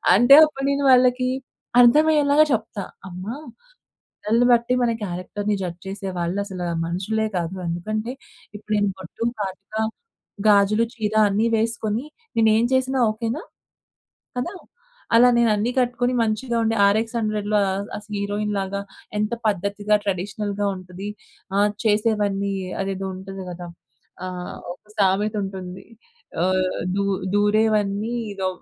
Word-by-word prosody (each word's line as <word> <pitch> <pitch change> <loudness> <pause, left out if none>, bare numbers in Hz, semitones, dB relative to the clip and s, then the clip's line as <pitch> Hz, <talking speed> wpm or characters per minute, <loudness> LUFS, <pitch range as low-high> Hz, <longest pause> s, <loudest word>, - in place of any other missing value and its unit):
అంటే 245 +7 +7
అప్పుడు 270 -3 -5
నేను 280 0 0
వాళ్ళకి 255 0 +4 0.5
అర్థం 245 +6 +7
అయ్యేలాగా 295 0 +5
చెప్తా. 220 -2 -2 0.2
అమ్మ 180 0 -8 0.8
బట్టల్ని 230 +3 0
బట్టి 235 +1 +3
మన 240 - +3
క్యారెక్టర్‌ని 200 +3 -3
జడ్జ్ 175 -1 -5
చేసే 195 0 -5
వాళ్ళు 175 +3 -1
అసల 190 -3 -6 0.2
మనుషులే 200 +6 -1
కాదు. 170 +1 -2
ఎందుకంటే 215 +7 -3 0.5
ఇప్పుడు 210 +1 -8
నేను 205 -1 +2
బొట్టు, 190 +4 -6 0.2
కాటుక, 195 +1 -6 0.7
గాజులు, 210 +2 +4
చీర 215 -2 -2
అన్ని 210 +3 +1
వేసుకొని 225 +1 -1 0.3
నేనేం 220 0 +4
చేసినా 260 +1 +1
ఓకేనా. 230 +7 -3 1.0
కదా! 345 +10 -3 0.6
అలా 245 +2 +7
నేనన్ని 225 -1 +2
కట్టుకొని 245 0 +1
మంచిగా 230 +2 -1
ఉండి 225 0 +1
'ఆర్ 200 +2 +4
ఎక్స్ 230 +1 -5
హండ్రెడ్‌లో' 215 -1 0 0.4
అస్ 210 - -9
హీరోయిన్ 205 +1 -2
లాగా 195 +1 -2 0.4
ఎంత 210 +1 -1 0.2
పద్ధతిగా, 205 +2 +1
ట్రెడిషనల్‌గా 200 +1 -2
ఉంటది. 185 +2 -8 0.5
ఆది 205 0 +2
చేసేవన్నీ 205 -2 +1 0.3
అదేదో 195 0 -3
ఉంటది 190 0 -8
గదా! 175 0 -7 0.6
ఆహ్, 180 -1 -6 0.2
ఒక - - -27
సామెత 200 +2 +2
ఉంటుంది. 190 -1 -7 0.6
ఆహ్ 185 0 +1 0.2
దు 200 - +1 0.3
దూరేవన్నీ 210 +1 +2 0.2
ఇదో 190 -1 -2
210 Hz, 125 wpm, -23 LUFS, 195-230 Hz, 1.0 s, అంటే